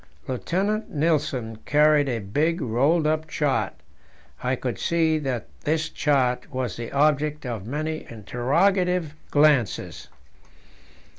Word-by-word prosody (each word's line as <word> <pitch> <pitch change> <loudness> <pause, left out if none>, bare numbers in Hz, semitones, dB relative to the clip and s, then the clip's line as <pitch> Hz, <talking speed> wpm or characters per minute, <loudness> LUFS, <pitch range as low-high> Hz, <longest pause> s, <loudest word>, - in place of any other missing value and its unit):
Lieutenant 195 - -1
Nilsen 145 -7 0
carried 150 +2 +3
a 120 - -1
big 145 - 0
rolled 140 +6 +2
up 155 +1 0
chart; 150 -2 0 0.7
I 130 +1 0
could 125 -1 -4
see 160 -2 +2
that 130 -6 -3
this 155 +1 -1
chart 130 -2 0
was 130 -4 -3
the 115 -1 -6
object 150 +1 +1
of 110 -5 -5
many 155 +4 -3
interrogative 165 - +1 0.2
glances. 145 -8 +2
145 Hz, 115 wpm, -24 LUFS, 125-155 Hz, 0.7 s, carried